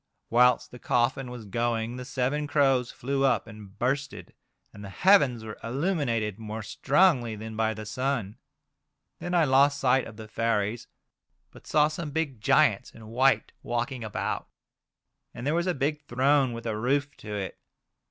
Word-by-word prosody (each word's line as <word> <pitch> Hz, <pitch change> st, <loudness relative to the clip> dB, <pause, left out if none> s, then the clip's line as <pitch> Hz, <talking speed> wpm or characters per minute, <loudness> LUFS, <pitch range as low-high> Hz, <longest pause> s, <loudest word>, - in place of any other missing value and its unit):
Whilst 125 Hz, +1 st, +4 dB
the 125 Hz, -, -11 dB
coffin 125 Hz, +2 st, 0 dB
was 120 Hz, -3 st, -8 dB
going 115 Hz, +2 st, -1 dB
the 125 Hz, -, -7 dB
seven 135 Hz, +3 st, -1 dB
crows 135 Hz, -4 st, +2 dB
flew 135 Hz, +2 st, -2 dB
up 135 Hz, -, +2 dB
and 105 Hz, -3 st, -13 dB
bursted, 135 Hz, +2 st, -2 dB, 0.4 s
and 100 Hz, -, -11 dB
the 100 Hz, -, -7 dB
heavens 140 Hz, -, +4 dB
were 110 Hz, -1 st, -8 dB
illuminated 120 Hz, -, -1 dB
more 110 Hz, 0 st, -6 dB
strongly 135 Hz, -, +2 dB
than 110 Hz, +1 st, -7 dB
by 110 Hz, 0 st, 0 dB
the 110 Hz, +1 st, -7 dB
sun. 115 Hz, -2 st, -2 dB, 0.8 s
Then 175 Hz, 0 st, -3 dB
I 170 Hz, -, +5 dB
lost 140 Hz, +1 st, +4 dB
sight 130 Hz, -1 st, +2 dB
of 105 Hz, -, -12 dB
the 110 Hz, -1 st, -9 dB
fairies, 110 Hz, 0 st, -1 dB, 0.6 s
but -, -, -16 dB
saw 150 Hz, -1 st, +4 dB
some 155 Hz, 0 st, -5 dB
big 145 Hz, -6 st, -3 dB
giants 125 Hz, -1 st, +3 dB
in 110 Hz, -, -13 dB
white 130 Hz, +4 st, +2 dB
walking 120 Hz, +1 st, -3 dB
about, 110 Hz, -2 st, -3 dB, 0.9 s
and 120 Hz, -, -6 dB
there 145 Hz, -, +1 dB
was 170 Hz, +2 st, 0 dB
a 180 Hz, -, +1 dB
big 145 Hz, +2 st, -1 dB
throne 135 Hz, +1 st, +3 dB
with 115 Hz, 0 st, -7 dB
a 110 Hz, -2 st, -1 dB
roof 140 Hz, +6 st, 0 dB
to 105 Hz, -1 st, -7 dB
it. 95 Hz, -2 st, -5 dB
125 Hz, 165 wpm, -27 LUFS, 110-140 Hz, 0.9 s, I